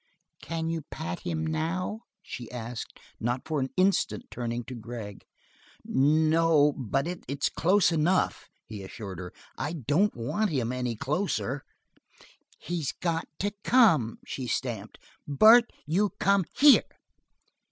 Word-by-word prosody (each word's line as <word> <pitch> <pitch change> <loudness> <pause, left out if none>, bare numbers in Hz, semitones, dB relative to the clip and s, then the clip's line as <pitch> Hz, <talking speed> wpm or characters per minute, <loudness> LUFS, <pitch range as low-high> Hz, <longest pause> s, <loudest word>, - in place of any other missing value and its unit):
"Can 165 -1 -3
you 165 0 -2
pat 160 +3 -5
him 165 -3 -3
now?" 165 +6 -2 0.2
she 120 -8 -8
asked, 120 -1 -7 0.2
not 120 +2 -1
for 155 -2 -1
an 130 0 -1
instant 190 +1 +1
turning 120 0 -3
to 130 - -8
Gregg. 115 -3 -8 0.6
"No, 155 +1 +3
but 135 +3 -1
it's 145 -5 -2
close 185 +1 +3
enough," 165 +3 +1 0.2
he 105 -2 -8
assured 95 -2 -8
her. 90 -1 -7 0.3
"I 150 +4 -2
don't 160 - +1
want 200 - -1
him 125 -7 -1
any 125 -2 -2
closer." 140 - -2 1.0
"He's 165 -5 -3
got 165 -2 -2
to 205 +1 -1
come." 165 - +4
She 130 -2 -5
stamped. 115 -5 -3 0.3
"Bart, 220 - +6
you 190 +7 +1
come 200 -2 +3
here!" 290 -1 +7
150 Hz, 130 wpm, -28 LUFS, 120-175 Hz, 1.0 s, here